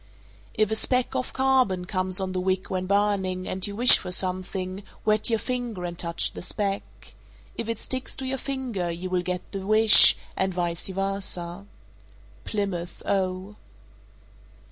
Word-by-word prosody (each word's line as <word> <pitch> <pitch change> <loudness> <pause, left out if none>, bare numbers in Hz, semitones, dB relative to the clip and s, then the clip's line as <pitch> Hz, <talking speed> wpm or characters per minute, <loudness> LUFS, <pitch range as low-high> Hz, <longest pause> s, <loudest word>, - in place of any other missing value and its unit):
_ - - -28 0.5
434. - - +3
If 215 - -2
a - - +1
speck 250 +3 +1
of 255 -1 -2
carbon 260 -9 +1
comes 185 0 +1
on 190 -1 -3
the 185 - -2
wick 185 0 -2
when 185 -1 -2
burning, 195 -2 0
and 185 +1 0
you 200 - -6
wish 245 +3 +7
for 180 - -7
something, 185 +1 -1 0.2
wet 215 +1 +3
your 225 - +2
finger 240 -5 -4
and 175 0 -5
touch 170 0 -1
the - - -9
speck. 200 +1 -4 0.4
If 230 - -5
it 230 - -2
sticks 260 +3 -3
to 265 - -5
your 265 0 -3
finger, 250 -11 -3
you 175 +2 -5
will 180 -1 +1
get 180 0 -5
the 195 -2 -5
wish, 215 +2 +7 0.2
and 190 -1 -1
vice 175 -1 0
versa. 195 -1 -2 0.8
_Plymouth, 190 -5 -4
O. 190 +1 -2
195 Hz, 165 wpm, -25 LUFS, 185-215 Hz, 0.8 s, wish